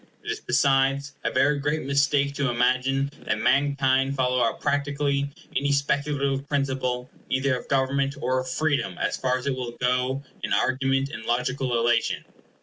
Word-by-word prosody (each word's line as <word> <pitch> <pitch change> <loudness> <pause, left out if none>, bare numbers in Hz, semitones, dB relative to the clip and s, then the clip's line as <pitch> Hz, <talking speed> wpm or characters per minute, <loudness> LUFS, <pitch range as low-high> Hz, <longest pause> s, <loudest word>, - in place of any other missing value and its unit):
It - - -3
is - - -4
besides 135 +2 +2
a - - +1
very 145 0 +2
great 145 +2 -1
mistake 140 +1 +2
to 140 -1 0
imagine 130 +3 +1 0.2
that - - +1
mankind 135 -1 +2
follow 125 -1 +1
up 115 -2 +1
practically 140 -1 0 0.3
any 140 +1 +1
speculative 140 0 0
principle, 130 -3 -1 0.2
either 130 0 +1
of - - -13
government 135 +1 +1
or 130 -2 0
of 130 0 -4
freedom, 140 - 0
as - - -1
far 130 -1 0
as 125 - -8
it 140 -2 0
will 125 -2 -5
go 125 +2 0 0.2
in - - -1
argument 135 +1 +1
and 110 - -7
logical 125 +1 0
illation. 120 +1 +1
135 Hz, 160 wpm, -25 LUFS, 130-140 Hz, 0.3 s, besides